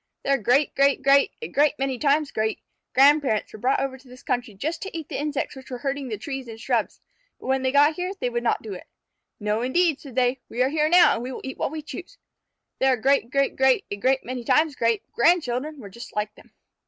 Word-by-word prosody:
Their 275 Hz, 0 st, +2 dB
great 255 Hz, +6 st, +2 dB
great 275 Hz, 0 st, +2 dB
great 275 Hz, 0 st, +4 dB
a -, -, -3 dB
great 295 Hz, +1 st, +2 dB
many 265 Hz, -2 st, -2 dB
times 295 Hz, 0 st, +2 dB
great 220 Hz, 0 st, -1 dB, 0.3 s
grandparents 275 Hz, -5 st, +3 dB
were 215 Hz, -, -9 dB
brought 255 Hz, +5 st, +1 dB
over 265 Hz, -1 st, -3 dB
to 260 Hz, -, -20 dB
this 250 Hz, 0 st, -14 dB
country 245 Hz, -4 st, -2 dB
just 310 Hz, -, -3 dB
to 385 Hz, -3 st, -5 dB
eat 315 Hz, -3 st, -7 dB
the -, -, -4 dB
insects 295 Hz, -1 st, -3 dB
which 265 Hz, -1 st, -12 dB
were 250 Hz, -, -5 dB
hurting 275 Hz, +1 st, -3 dB
the 220 Hz, -3 st, -4 dB
trees 265 Hz, +4 st, -6 dB
and 225 Hz, -1 st, -9 dB
shrubs, 230 Hz, -1 st, -1 dB, 0.4 s
but -, -, -13 dB
when 265 Hz, 0 st, +1 dB
they 260 Hz, 0 st, 0 dB
got 290 Hz, +3 st, +5 dB
here 360 Hz, +2 st, -3 dB
they 245 Hz, -, -1 dB
would 240 Hz, 0 st, -1 dB
not 240 Hz, -, 0 dB
do 215 Hz, -3 st, -6 dB
it. 180 Hz, -, -10 dB, 0.5 s
"No, 210 Hz, +1 st, -1 dB
indeed," 305 Hz, +4 st, +1 dB
said 270 Hz, -5 st, -12 dB
they; 255 Hz, 0 st, +1 dB
"we 245 Hz, +2 st, 0 dB
are 260 Hz, -, +1 dB
here 305 Hz, +1 st, +1 dB
now, 350 Hz, +1 st, +6 dB
and 230 Hz, -, -3 dB
we 250 Hz, +2 st, -5 dB
will -, -, -7 dB
eat 265 Hz, -, -7 dB
what -, -, 0 dB
we 310 Hz, +1 st, -6 dB
choose." 360 Hz, +10 st, -9 dB, 0.6 s
Their 265 Hz, -1 st, +3 dB
great 265 Hz, 0 st, +2 dB
great 275 Hz, +1 st, +1 dB
great 265 Hz, -1 st, +3 dB
a -, -, -1 dB
great 260 Hz, +6 st, +1 dB
many 250 Hz, 0 st, -5 dB
times 305 Hz, +4 st, +2 dB
great 230 Hz, -3 st, +1 dB
grandchildren 300 Hz, -1 st, +1 dB
were 215 Hz, -, -9 dB
just 235 Hz, +5 st, -11 dB
like 210 Hz, 0 st, -2 dB
them. -, -, -20 dB
265 Hz, 240 wpm, -24 LUFS, 240-290 Hz, 0.6 s, now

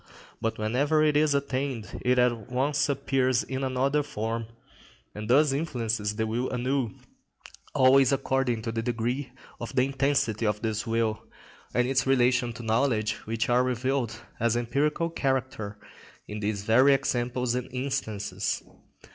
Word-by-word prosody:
But 115 Hz, -, -1 dB
whenever 140 Hz, +8 st, +2 dB
it 150 Hz, -1 st, +3 dB
is 150 Hz, -1 st, +3 dB
attained 135 Hz, -4 st, -3 dB
it 125 Hz, 0 st, +3 dB
at 120 Hz, -2 st, +1 dB
once 140 Hz, +3 st, +1 dB
appears 135 Hz, -2 st, +1 dB
in 130 Hz, +1 st, -4 dB
another 135 Hz, +3 st, +1 dB
form, 115 Hz, -4 st, -3 dB, 0.7 s
and 105 Hz, +1 st, -6 dB
thus 145 Hz, +3 st, +5 dB
influences 115 Hz, -8 st, -1 dB
the 110 Hz, +1 st, 0 dB
will 120 Hz, +4 st, -1 dB
anew, 125 Hz, -2 st, -1 dB, 0.8 s
always 130 Hz, 0 st, +6 dB
according 135 Hz, -4 st, 0 dB
to 115 Hz, -, -2 dB
the 115 Hz, 0 st, -2 dB
degree 120 Hz, +3 st, -2 dB, 0.3 s
of 115 Hz, -, -6 dB
the 125 Hz, -, +4 dB
intensity 135 Hz, -5 st, +1 dB
of 105 Hz, +1 st, -1 dB
this 110 Hz, 0 st, -2 dB
will, 115 Hz, -1 st, 0 dB, 0.5 s
and 125 Hz, +1 st, +3 dB
its 135 Hz, 0 st, +1 dB
relation 125 Hz, -2 st, +3 dB
to 115 Hz, -, -9 dB
knowledge 110 Hz, -1 st, +1 dB
which 110 Hz, 0 st, -1 dB
are 125 Hz, +1 st, +3 dB
revealed 125 Hz, -2 st, -1 dB, 0.2 s
as 115 Hz, 0 st, +2 dB
empirical 145 Hz, +7 st, 0 dB
character, 130 Hz, -8 st, -2 dB, 0.5 s
in 105 Hz, 0 st, -5 dB
these 105 Hz, -1 st, -2 dB
very 130 Hz, +6 st, +5 dB
examples 125 Hz, -2 st, -1 dB
and 125 Hz, 0 st, -3 dB
instances. 110 Hz, -7 st, -2 dB
125 Hz, 145 wpm, -27 LUFS, 115-135 Hz, 0.8 s, always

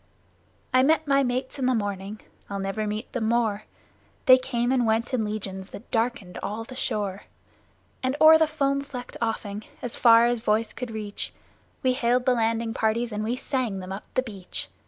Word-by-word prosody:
I 255 Hz, -, +6 dB
met 315 Hz, +3 st, +3 dB
my 275 Hz, 0 st, +4 dB
mates 255 Hz, +1 st, -2 dB
in 255 Hz, -, +1 dB
the 255 Hz, -, +3 dB
morning 205 Hz, -1 st, -3 dB, 0.3 s
(I'll 200 Hz, -, -3 dB
never 195 Hz, +2 st, -2 dB
meet 215 Hz, +3 st, -4 dB
them 225 Hz, -3 st, 0 dB
more!); 220 Hz, -3 st, +1 dB, 0.6 s
They 255 Hz, 0 st, +8 dB
came 245 Hz, -1 st, -1 dB
and 250 Hz, -3 st, +2 dB
went 225 Hz, +3 st, +1 dB
in 240 Hz, -3 st, +1 dB
legions 195 Hz, -2 st, -5 dB
that 225 Hz, -, -11 dB
darkened 225 Hz, -6 st, -1 dB
all 215 Hz, +2 st, -3 dB
the 255 Hz, +3 st, -10 dB
shore. 205 Hz, -5 st, -2 dB, 0.8 s
And 260 Hz, +1 st, 0 dB
o'er 315 Hz, 0 st, +9 dB
the 320 Hz, -, +4 dB
foam 280 Hz, -2 st, 0 dB
flecked 260 Hz, -3 st, -8 dB
offing 215 Hz, -2 st, -2 dB, 0.2 s
as 245 Hz, -, -4 dB
far 230 Hz, -1 st, +7 dB
as 240 Hz, 0 st, +1 dB
voice 220 Hz, 0 st, 0 dB
could 250 Hz, -1 st, -5 dB
reach 215 Hz, -2 st, -5 dB, 0.5 s
We 255 Hz, -1 st, +3 dB
hailed 250 Hz, 0 st, +1 dB
the 255 Hz, -, +4 dB
landing 230 Hz, -1 st, 0 dB
parties 230 Hz, +2 st, 0 dB
and 210 Hz, 0 st, -2 dB
we 230 Hz, +3 st, -1 dB
sang 255 Hz, -6 st, -2 dB
them 185 Hz, 0 st, -7 dB
up 195 Hz, -, -7 dB
the 255 Hz, -, +2 dB
beach. 200 Hz, -7 st, -7 dB
230 Hz, 190 wpm, -26 LUFS, 210-255 Hz, 0.8 s, o'er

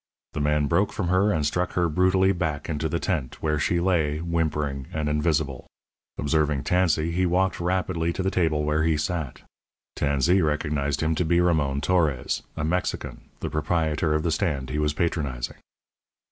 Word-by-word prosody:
The -, -, -2 dB
man 75 Hz, 0 st, +2 dB
broke 90 Hz, +8 st, +2 dB
from 90 Hz, -5 st, -2 dB
her 95 Hz, +3 st, +3 dB
and 80 Hz, -6 st, 0 dB
struck 90 Hz, +4 st, -1 dB
her 90 Hz, -1 st, +2 dB
brutally 95 Hz, +3 st, +3 dB
back 75 Hz, -5 st, -2 dB
into 80 Hz, 0 st, -2 dB
the 85 Hz, -, 0 dB
tent, 80 Hz, -11 st, -2 dB
where 75 Hz, -1 st, +1 dB
she 85 Hz, +3 st, +1 dB
lay, 85 Hz, -5 st, +1 dB
whimpering 75 Hz, -5 st, -2 dB
and 75 Hz, -1 st, -2 dB
invisible. 75 Hz, -3 st, 0 dB, 0.5 s
Observing 75 Hz, -1 st, +1 dB
Tansey, 85 Hz, -3 st, +2 dB
he 90 Hz, +2 st, +1 dB
walked 95 Hz, +2 st, +1 dB
rapidly 90 Hz, -1 st, 0 dB
to 95 Hz, -, -3 dB
the 95 Hz, -, 0 dB
table 80 Hz, -5 st, +1 dB
where 75 Hz, +1 st, +1 dB
he 80 Hz, -1 st, +2 dB
sat. 75 Hz, -3 st, -3 dB, 0.5 s
Tansey 70 Hz, +7 st, +2 dB
recognized 75 Hz, -2 st, 0 dB
him 80 Hz, 0 st, +1 dB
to 80 Hz, -, 0 dB
be 85 Hz, +1 st, +2 dB
Ramon 75 Hz, -6 st, +1 dB
Torres, 75 Hz, -8 st, +1 dB, 0.2 s
a 80 Hz, -, -2 dB
Mexican, 90 Hz, +4 st, -3 dB
the -, -, -2 dB
proprietor 80 Hz, 0 st, 0 dB
of 75 Hz, -, 0 dB
the 85 Hz, -, 0 dB
stand 75 Hz, -6 st, -1 dB
he 75 Hz, -, -1 dB
was 75 Hz, -1 st, +1 dB
patronizing. 70 Hz, -8 st, -2 dB
80 Hz, 175 wpm, -25 LUFS, 75-90 Hz, 0.5 s, her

